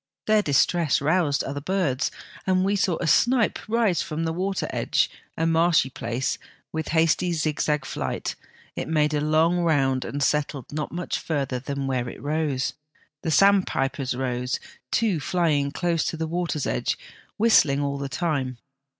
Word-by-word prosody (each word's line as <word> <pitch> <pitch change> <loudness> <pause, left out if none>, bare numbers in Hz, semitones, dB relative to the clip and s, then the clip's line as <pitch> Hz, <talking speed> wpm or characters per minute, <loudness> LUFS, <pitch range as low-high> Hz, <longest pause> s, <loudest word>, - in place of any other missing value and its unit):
Their 215 0 +4
distress 155 0 +2
roused 155 -1 +1
other 145 +1 -4
birds, 165 -6 0 0.4
and 185 0 +3
we 200 +1 +2
saw 185 -4 +1
a - - -3
snipe 240 +7 +3
rise 220 -5 +2
from 165 -3 -3
the 160 0 -1
water 190 +2 -1
edge, - - +1 0.3
a 165 - +1
marshy 165 -4 +3
place, 120 +2 -2 0.3
with 160 -1 -3
hasty 165 +2 +2
zigzag 150 -2 0
flight; - - -3 0.4
it - - -4
made 150 -1 +2
a 145 - +1
long 160 +3 +3
round 135 -6 +2
and 145 0 -3
settled 145 -3 0
not 150 0 -3
much 175 +1 -3
further 135 -5 -2
than 140 +1 -4
where 125 -2 -1
it - - -10
rose. 145 -1 -1 0.5
The - - -2
sandpipers 150 -8 +2
rose, 125 -1 -2 0.3
two 210 - +1
flying 150 -3 +1
close 170 +1 0
to 165 - -2
the 160 - -2
water's 165 -3 -2
edge, - - -1 0.4
whistling 205 -11 +4
all 140 -1 -2
the 140 -1 -4
time. 135 -3 -1
155 Hz, 160 wpm, -25 LUFS, 140-175 Hz, 0.5 s, Their